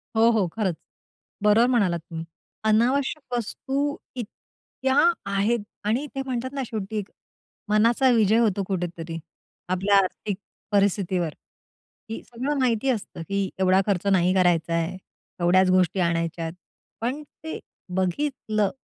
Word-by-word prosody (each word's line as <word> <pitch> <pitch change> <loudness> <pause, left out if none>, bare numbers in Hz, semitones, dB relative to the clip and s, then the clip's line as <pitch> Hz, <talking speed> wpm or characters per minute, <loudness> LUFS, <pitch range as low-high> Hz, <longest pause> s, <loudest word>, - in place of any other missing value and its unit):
हो, 225 +1 +6
हो, 215 -5 +2
खरंच. 195 -6 0 0.7
बरोबर 210 +3 +5
म्हणालात 200 -9 +2
तुम्ही. 165 0 -7 0.4
अनावश्यक 255 +6 +1
वस्तू 275 +5 -2 0.2
इतक्या 260 +2 -5 0.4
आहेत 205 +4 +2 0.3
आणि 235 +8 +1
ते 270 - -1
म्हणतात 260 0 -3
ना 275 -1 -2
शेवटी 215 -1 -3 0.7
मनाचा 230 +5 +4
विजय 220 -2 +4
होतो 210 -4 +2
कुठेतरी 170 -3 -3 0.5
आपल्या 195 +2 +3
आर्थिक 195 +1 0 0.3
परिस्थितीवर, 195 -4 +2 0.8
की 225 - -5
सगळं 260 +5 -2
माहिती 250 0 +2
असतं 220 -8 -2
की 200 -1 0
एवढा 190 0 +4
खर्च 200 -1 0
नाही 185 -1 +4
करायचा 175 -3 +3
आहे. 170 +2 -1 0.4
एवढ्याच 185 +2 +4
गोष्टी 185 0 +3
आणायच्यात, 165 -1 0 0.5
पण 255 +6 -1
ते 320 +2 -8 0.4
बघितलं, 215 +1 0
205 Hz, 120 wpm, -25 LUFS, 185-240 Hz, 0.8 s, हो